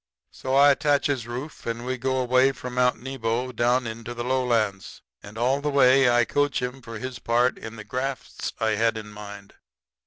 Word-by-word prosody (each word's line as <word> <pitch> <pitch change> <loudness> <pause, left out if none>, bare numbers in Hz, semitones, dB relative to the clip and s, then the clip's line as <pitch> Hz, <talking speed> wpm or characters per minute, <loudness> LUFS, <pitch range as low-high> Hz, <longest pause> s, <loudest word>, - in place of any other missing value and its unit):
"So 130 0 -3
I 140 +1 +7
attaches 140 -4 +1
Rufe, 125 +5 -7
and 115 +1 -3
we 130 +1 -1
go 130 +1 -1
away 130 +2 +3
from 125 -2 -7
Mount 125 0 +2
Nebo 125 -1 -2
down 120 +1 +1
into 115 +1 -6
the 120 - -4
lowlands. 120 -6 -1 0.2
And 105 +2 -11
all 130 +4 +1
the 150 - -1
way 135 -2 +5
I 120 0 +4
coach 145 +1 0
him 125 +1 -4
for 115 -2 -8
his 125 +1 -6
part 120 +3 +2
in 110 0 -9
the 110 - -8
grafts 130 +4 -4
I 110 0 +1
had 110 +1 +1
in 105 -1 -7
mind. 105 -1 -10
125 Hz, 190 wpm, -25 LUFS, 115-130 Hz, 0.2 s, I